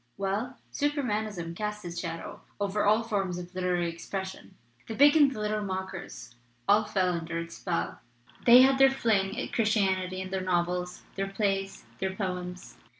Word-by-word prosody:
"Well, 210 +7 -2 0.2
Supermanism 215 - -1
cast 210 0 -4
its 170 0 -4
shadow 165 -1 -6 0.2
over 205 +1 0
all 215 +2 +4
forms 195 -5 -1
of 180 +1 -8
literary 180 -1 0
expression. 170 - -6 0.3
The 225 - -5
big 285 +4 +7
and 290 -3 +6
the 250 - -6
little 210 0 -1
mockers 190 -10 -6 0.3
all 210 +1 +5
fell 190 -3 +1
under 170 0 -3
its 170 0 -6
spell 175 -3 -2 0.5
they 245 +2 +10
had 265 0 +4
their 270 0 +8
fling 215 -6 +1
at - - -5
Christianity 190 -4 +1
in 190 0 -5
their 190 -1 -1
novels, 180 0 -1
their 195 0 -2
plays, 195 -1 -2
their 190 0 -2
poems. 180 -2 -5
195 Hz, 160 wpm, -29 LUFS, 180-215 Hz, 0.5 s, they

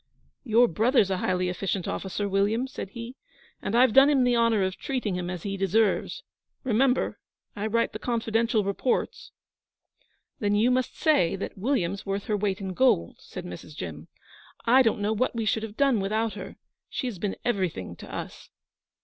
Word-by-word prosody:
'Your 240 -1 +4
brother's 220 - +2
a 190 - +1
highly 180 0 0
efficient 180 +1 -2
officer, 200 +1 -3
William,' 200 +5 +1
said 265 -7 -7
he, 235 +3 -8 0.5
and 205 - -2
I've 245 -1 +5
done 270 +3 +8
him 275 -3 +4
the 245 -1 +3
honour 230 -3 +3
of 190 0 -1
treating 250 -7 -2
him 180 -1 -3
as 180 -2 -5
he 195 -1 -3
deserves. 205 - +1 0.4
Remember, 255 +1 +1 0.4
I 210 0 -2
write 230 +2 +1
the - - -5
confidential 230 -1 0
reports.' 200 +6 -1 1.1
'Then 205 -1 +1
you 225 +4 +3
must 255 0 0
say 290 - +3
that 195 - -5
William's 200 -4 -1
worth 195 0 -3
her 215 - -1
weight 200 -2 -1
in 190 -2 -4
gold,' 175 - +2
said - - -8
Mrs. 90 - -9
Jim. 80 - -7 0.6
'I 250 +3 +6
don't 225 -4 +2
know 210 +2 +1
what 240 +3 0
we 225 -1 -1
should 220 +1 +1
have 220 -1 -7
done 275 -5 +3
without 215 +3 0
her. - - -8 0.3
She - - -3
has 230 -8 -4
been 200 +1 -2
everything 180 - -1
to - - -11
us.' - - -7
215 Hz, 180 wpm, -27 LUFS, 195-240 Hz, 1.1 s, done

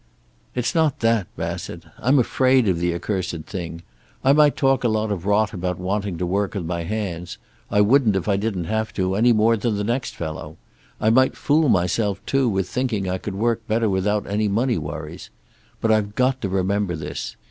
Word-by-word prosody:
"It's 125 -1 -1
not 160 -4 +1
that, 115 -5 +2
Bassett. 85 0 -5 0.2
I'm 130 +4 +3
afraid 130 -1 +3
of 90 -3 +1
the 85 0 +1
accursed 90 -3 -3
thing. 85 -3 -6 0.4
I 135 - +5
might 150 -1 +5
talk 135 -1 +2
a - - +3
lot 110 -1 0
of 95 -1 -3
rot 105 +1 +2
about 90 -2 -2
wanting 100 0 -2
to 90 - -1
work 100 +3 -1
with 95 -4 -3
my 85 0 -3
hands. 90 -4 -4 0.3
I 105 - +3
wouldn't 115 -1 +4
if 95 - -1
I 100 - +3
didn't 100 -3 -2
have 110 +5 -2
to, 95 -1 0
any 115 +5 +4
more 115 +1 +4
than 110 -1 -1
the 105 - -1
next 120 +4 -2
fellow. 80 -2 -6 0.4
I 110 - +3
might 130 +3 +3
fool 150 0 +2
myself, 95 +2 +1
too, 135 -2 +2
with 95 -3 -1
thinking 120 -6 -1
I 90 0 -1
could 100 0 -5
work 115 +2 -1
better 110 -1 +1
without 100 +2 0
any 105 +2 0
money 115 +3 +1
worries. 75 +3 -7 0.5
But 110 - +1
I've 105 -1 +1
got 130 0 +1
to 100 - -2
remember 95 0 0
this. 75 -2 -5
105 Hz, 200 wpm, -22 LUFS, 90-115 Hz, 0.5 s, I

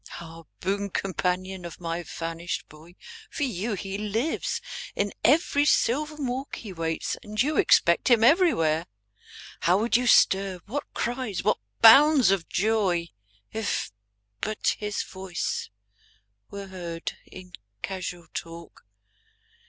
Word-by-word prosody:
Ah, 165 -1 -11 0.2
boon 200 +2 -1
companion 185 0 -2
of 170 - -8
my 170 0 -3
vanished 165 +1 -5
boy. 160 +3 -16 0.3
For 290 - -3
you 220 -3 -2
he 195 +1 -5
lives; 220 +9 -1 0.4
in 200 0 -1
every 290 +1 +4
sylvan 295 +1 +1
walk 260 +3 -3
He 210 -5 -8
waits; 165 -1 -2
and 215 -2 -8
you 295 +5 +2
expect 170 0 +4
him 235 -3 +5
everywhere. 230 - +3 0.7
How 175 +3 +3
would 225 +2 +1
you 245 +1 +3
stir, 190 -4 +4
what 280 +7 -5
cries, 240 -5 -2
what - - +2 0.2
bounds 275 0 +8
of 190 -4 -1
joy. 190 -5 +1 0.4
If 220 - -2 0.5
but 215 -1 -1
his 210 -1 -2
voice 190 -2 -4 0.8
were 200 0 -7
heard 170 -3 -5
in 180 -1 -12 0.3
casual 185 -3 -5
talk. 165 0 -8
195 Hz, 125 wpm, -26 LUFS, 175-235 Hz, 0.8 s, bounds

